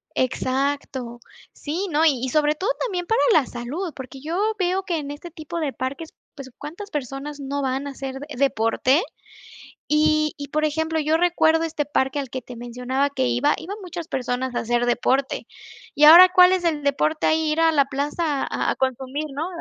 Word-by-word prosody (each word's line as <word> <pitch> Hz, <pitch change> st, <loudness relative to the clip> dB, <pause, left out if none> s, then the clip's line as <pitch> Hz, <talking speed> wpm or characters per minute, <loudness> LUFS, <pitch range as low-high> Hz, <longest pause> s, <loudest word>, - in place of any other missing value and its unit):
Exacto. 260 Hz, -1 st, -2 dB, 0.3 s
Sí, 345 Hz, +7 st, -4 dB
no, 305 Hz, +2 st, +2 dB
y 285 Hz, -5 st, +4 dB
y 260 Hz, -, -3 dB
sobre 300 Hz, +2 st, +2 dB
todo 380 Hz, +9 st, -2 dB
también 365 Hz, -7 st, -2 dB
para 450 Hz, +5 st, +1 dB
la 290 Hz, -5 st, +4 dB
salud, 285 Hz, +10 st, -5 dB
porque 265 Hz, 0 st, -9 dB
yo 320 Hz, +3 st, -4 dB, 0.2 s
veo 370 Hz, +1 st, 0 dB
que 345 Hz, -4 st, -2 dB
en 285 Hz, -1 st, -5 dB
este 325 Hz, +4 st, -9 dB
tipo 335 Hz, +1 st, -6 dB
de 295 Hz, -4 st, -1 dB
parques, 280 Hz, +5 st, -5 dB, 0.2 s
pues, 265 Hz, -3 st, -10 dB
¿cuántas 345 Hz, +8 st, -8 dB
personas 285 Hz, +1 st, -5 dB
no 280 Hz, 0 st, -3 dB
van 265 Hz, +2 st, -2 dB
a -, -, -5 dB
hacer 270 Hz, 0 st, -6 dB, 0.2 s
deporte?, 260 Hz, +3 st, +2 dB, 0.9 s
y 305 Hz, +1 st, +3 dB
y 285 Hz, 0 st, -7 dB
por 305 Hz, +1 st, 0 dB
ejemplo, 320 Hz, +1 st, -1 dB
yo 310 Hz, +2 st, +2 dB
recuerdo 325 Hz, -2 st, +3 dB
este 315 Hz, -2 st, -2 dB
parque 270 Hz, 0 st, 0 dB
al 270 Hz, -3 st, -5 dB
que 260 Hz, 0 st, -5 dB
te 250 Hz, -, -10 dB
mencionaba 250 Hz, +4 st, -2 dB
que 205 Hz, -, -1 dB
iba, 120 Hz, 0 st, +2 dB
iban 400 Hz, +5 st, -7 dB
muchas 350 Hz, -2 st, -7 dB
personas 255 Hz, 0 st, -2 dB
a -, -, +1 dB
hacer 240 Hz, +1 st, 0 dB
deporte. 260 Hz, +3 st, 0 dB, 0.5 s
¿Y 295 Hz, -, +2 dB
ahora 350 Hz, +4 st, +10 dB
cuál 360 Hz, 0 st, +7 dB
es 370 Hz, -1 st, 0 dB
el 305 Hz, -4 st, 0 dB
deporte 305 Hz, +2 st, 0 dB
ahí? 315 Hz, -1 st, +2 dB
Ir 315 Hz, -, 0 dB
a 325 Hz, 0 st, +4 dB
la 280 Hz, -3 st, +3 dB
plaza 285 Hz, +2 st, -2 dB
a -, -, -1 dB
a -, -, -2 dB
consumir, 265 Hz, +3 st, -2 dB
¿no? 315 Hz, +5 st, -3 dB
290 Hz, 195 wpm, -23 LUFS, 265-320 Hz, 0.9 s, ahora